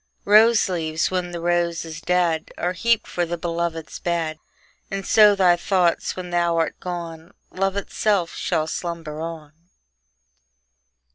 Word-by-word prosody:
Rose 220 +2 +6
leaves, 160 -3 -1
when 180 -1 -1
the 175 -1 -6
rose 170 -1 0
is 160 -1 -8
dead, 175 -2 0
Are 180 +1 -1
heaped 230 +5 +1
for 175 - -2
the 175 0 -3
beloved's 165 -1 -3
bed; 165 -3 -2 0.5
And 195 0 -4
so 210 -2 +6
thy 185 -3 +4
thoughts, 175 -1 +1
when 180 -1 -7
thou 170 -1 +1
art 165 - -1
gone, 170 0 -7 0.2
Love 195 +1 -1
itself 200 -3 0
shall 160 -4 -1
slumber 160 -2 -5
on. 160 -3 -7
175 Hz, 140 wpm, -22 LUFS, 165-185 Hz, 0.5 s, Rose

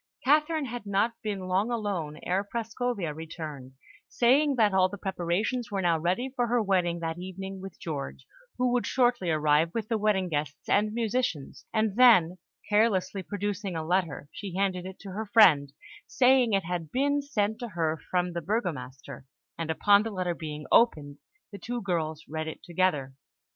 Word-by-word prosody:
Catherine 300 +2 +3
had 240 -4 -6
not 200 +4 +1
been 205 -3 -3
long 185 +4 0
alone 200 -10 -3
ere 185 +3 0
Prascovia 225 -4 -3
returned, 155 -4 -8 0.4
saying 275 +4 +3
that 215 -5 +3
all 185 -1 +4
the 205 - -7
preparations 195 +6 -2
were 195 -2 -2
now 170 -2 +2
ready 185 +11 -1
for 245 -2 +1
her 240 +1 +2
wedding 180 -5 +1
that 165 +1 -3
evening 190 +1 -7
with 195 -2 -10
George, 145 -4 -5 0.3
who 250 0 +1
would 245 - 0
shortly 245 -8 +2
arrive 155 +1 +3
with 220 -2 -3
the 225 -2 0
wedding 205 -3 +1
guests 145 -2 -4
and 210 +1 +2
musicians; 225 - -2
and 220 -2 0
then, 185 -9 +6 0.3
carelessly 205 -3 +2
producing 205 -1 -4
a 160 -1 -3
letter, 170 -4 -1
she 195 -4 -7
handed 185 -2 -1
it 190 - -9
to 195 - -8
her 215 +3 -4
friend, 160 -11 +5 0.4
saying 250 -3 +4
it 195 -3 +1
had 170 -3 -4
been 285 +2 +1
sent 220 -7 -1
to 240 - -4
her 165 -6 -1
from 180 -1 0
the 170 - -3
Burgomaster, 150 - -4 0.3
and 165 -1 -4
upon 200 +5 +4
the 225 - -3
letter 185 -4 -2
being 150 -2 -7
opened, 150 -11 +3 0.3
the 200 - -9
two 245 +1 -4
girls 165 -6 -2
read 155 +1 -4
it 160 - -7
together. 160 -7 0
190 Hz, 175 wpm, -28 LUFS, 165-225 Hz, 0.4 s, then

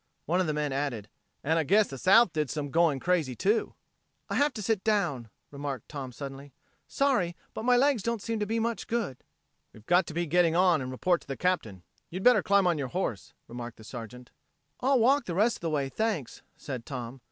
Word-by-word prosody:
One 175 +4 +1
of 180 - -1
the 155 - 0
men 150 -2 -1
added: 130 -7 -3 0.3
"And 160 +3 +2
I - - +2
guess 205 +7 +4
the 135 - -8
South 195 - +5
did 150 -3 -1
some 145 -2 -4
going 165 -3 +3
crazy, 160 -6 0
too." 210 - 0 0.6
"I - - 0
have 290 +1 +3
to 215 - -4
sit 215 -1 0
down," 145 - 0 0.2
remarked 140 -4 -6
Tom 135 -4 -6
suddenly. 135 +1 -9 0.3
"Sorry, 240 -12 +1 0.2
but 220 - -5
my 250 0 +5
legs 270 -3 +3
don't 235 +2 -1
seem 225 +2 -3
to 210 - -1
be 225 +2 -1
much 230 0 -2
good." 220 - -3 0.5
"We've 110 - -16
got 180 +2 +3
to 160 - -7
be 170 0 0
getting 170 +1 +3
on 175 -4 +4
and 130 - -4
report 170 +7 0
to - - -19
the 135 - -5
Captain. 115 - -1 0.3
You'd 185 +3 -5
better 245 -5 +6
climb 200 0 +3
on 170 -4 +2
your 135 - -2
horse," 125 - -4
remarked 120 -1 -7
the 110 - -13
Sergeant. 120 +1 -9 0.5
"I'll 270 +1 +3
walk 270 +5 +3
the 170 - -4
rest 220 +5 +2
of - - -25
the 165 - -1
way, 145 -3 0
thanks," 195 - -3 0.2
said 130 -5 -6
Tom. 125 -1 -6
165 Hz, 220 wpm, -28 LUFS, 135-210 Hz, 0.6 s, better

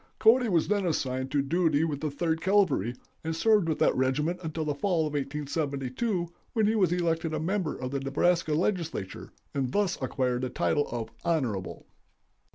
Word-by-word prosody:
"Cody 230 +2 +5
was 170 -4 +2
then 205 -1 +1
assigned 130 -4 -1
to 140 0 +1
duty 160 0 +2
with 150 -4 -2
the 155 - -1
Third 160 +3 -1
Cavalry, 175 - +2 0.3
and 160 0 -2
served 205 0 +3
with 155 - 0
that - - +3
regiment 150 +7 0
until 160 -1 -3
the 150 - 0
fall 175 +3 0
of 150 - -4
1872, 145 - -2 0.3
when 220 -2 +2
he 215 - +3
was 190 -6 +3
elected 165 -2 0
a - - -1
member 180 0 -1
of 130 0 -4
the 140 - -1
Nebraska 155 +4 +1
Legislature, 165 - -2 0.2
and 135 -3 -1
thus 205 -7 0
acquired 125 -1 0
the 130 - -2
title 145 +3 +1
of 115 -2 -4
'Honorable. 125 - -1
155 Hz, 175 wpm, -28 LUFS, 135-180 Hz, 0.3 s, Cody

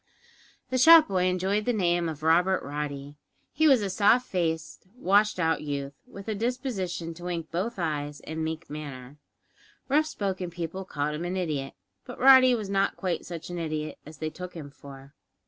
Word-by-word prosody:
The 255 - +1
shop 320 +3 +8
boy 185 -1 +1
enjoyed 190 +3 0
the 245 - +1
name 175 -4 +1
of 155 -1 -7
Robert 180 +4 +3
Roddy. 145 0 -5 0.4
He 315 +3 +3
was 260 -7 +5
a 200 - -1
soft 220 +6 +4
faced, 165 -2 -3
washed 210 -3 +2
out 160 -2 +1
youth, 140 -1 -4
with 200 +1 -11
a 220 - -1
disposition 200 -7 -3
to 175 +2 -11
wink 170 -2 -4
both 200 +7 -2
eyes 150 -4 -3
in 160 +1 -6
a - - -2
meek 160 +1 -4
manner. 145 -2 -8 0.7
Rough 300 +3 +3
spoken 190 - -3
people 175 +2 -5
called 150 -3 -2
him 150 +3 -4
an 180 +2 -3
idiot, 150 -7 -3 0.3
but - - -9
Roddy 260 -1 +7
was 215 -4 -4
not 195 0 0
quite 180 -3 -2
such 170 0 -7
an 175 - -4
idiot 155 -2 -4
as 155 +1 -12
they 155 +1 -4
took 180 +3 -8
him 145 -4 -8
for. 140 0 -13
175 Hz, 185 wpm, -27 LUFS, 155-200 Hz, 0.7 s, shop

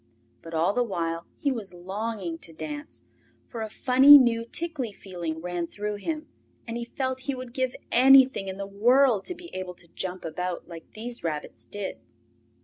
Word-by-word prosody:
But 165 0 -8
all 165 +5 +2
the 245 - +1
while 170 -5 -3
he 285 - 0
was 205 -8 -5
longing 190 -1 -4
to 165 - -12
dance, 295 - -7 0.4
for 230 - -7
a 220 - -3
funny 265 +5 +8
new 235 -3 +3
tickly 285 -4 -2
feeling 175 -5 -6
ran 175 -1 -3
through 210 +2 -4
him, 310 +8 -4 0.4
and 230 - -4
he 235 0 -3
felt 260 +1 -3
he 275 - +1
would 255 -2 -8
give 260 -1 -1 0.2
anything 265 -4 +6
in 190 0 -5
the 200 - -4
world 230 +2 +3
to 360 - -5
be 345 0 -12
able 185 -1 -5
to 175 - -15
jump 185 0 -4
about 180 +2 -4
like 170 -2 -11
these 235 +2 -5
rabbits 155 -3 -5
did. 205 - -5
210 Hz, 180 wpm, -27 LUFS, 180-255 Hz, 0.4 s, funny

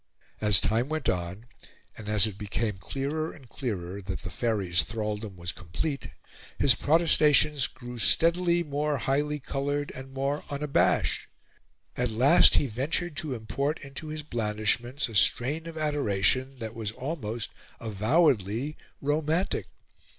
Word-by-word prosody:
As 105 -4 +5
time 115 +5 0
went 155 -2 -1
on, 90 +5 -3 0.5
and 105 -1 -8
as 105 -1 +5
it 105 -3 -3
became 105 0 -3
clearer 145 - -3
and 135 -5 -15
clearer 100 -7 -4
that 95 0 -5
the 90 - -6
Faery's 95 -5 +1
thraldom 105 +2 -4
was 85 0 -2
complete, 120 - -4 0.5
his 135 - +5
protestations 150 -1 +4
grew 120 -2 -9
steadily 170 - +3
more 150 -1 -1
highly 145 +3 0
coloured 145 +1 -2
and 130 +1 -9
more 135 +2 -2
unabashed. 145 0 +1 0.7
At 125 -1 0
last 120 +6 +6
he - - +3
ventured 145 +7 -2
to 155 -6 -3
import 140 +7 -2
into 140 +3 -8
his 155 0 -5
blandishments 120 +2 0
a 115 - -10
strain 140 +10 +2
of 165 -1 -7
adoration 135 - +1
that 110 -2 -6
was 110 -3 -3
almost 120 -5 -4 0.3
avowedly 115 - +1 0.3
romantic. 155 +5 0
130 Hz, 135 wpm, -28 LUFS, 105-150 Hz, 0.7 s, last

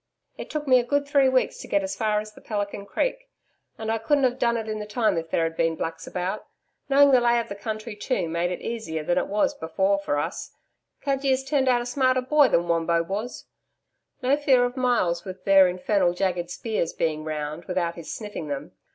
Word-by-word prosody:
It - - -8
took 300 -1 -4
me 255 -1 +6
a - - 0
good 285 +3 0
three 280 -2 +4
weeks 260 -1 +1
to - - -8
get 200 -1 +1
as 190 0 -3
far 215 0 +1
as 215 0 -8
the - - -15
Pelican 205 -1 -4
Creek, - - -2 0.5
and 220 0 -3
I 225 - 0
couldn't 280 +5 +2
have 255 0 +1
done 235 -1 +2
it 220 -1 -4
in 215 0 -3
the 210 - -6
time 215 -2 +1
if 165 0 -3
there 165 - +1
had 165 0 -2
been 165 0 +1
Blacks 165 0 -5
about. 185 +3 -3 0.4
Knowing 280 +1 +6
the 255 -2 +5
lay 240 0 +3
of 230 - -4
the 200 - -5
country 215 +1 -5
too, 205 -4 -1
made 170 +2 -1
it 180 - -4
easier 220 -10 -4
than 175 +3 +1
it - - -2
was 205 +1 +1
before 190 +5 0
for 145 -7 -1
us. 145 - -4 0.5
Cudgee 275 -1 0
has 260 0 +2
turned 270 -1 +1
out 240 -1 +3
a - - -9
smarter 255 +1 +2
boy 290 +2 +4
than 175 -6 +1
Wombo 170 0 +1
was. 205 +8 -5 0.8
No 260 +3 +4
fear 265 -4 +4
of 245 +1 -4
Myalls 235 -10 +1
with 185 -1 -9
their 195 -1 +7
infernal 180 0 +1
jagged 180 -2 -1
spears 210 -2 -2
being 155 -2 -1
round 155 +1 -4
without 180 -2 -1
his 170 -2 -8
sniffing 205 -7 -6
them. 140 -1 -5
210 Hz, 225 wpm, -25 LUFS, 175-250 Hz, 0.8 s, their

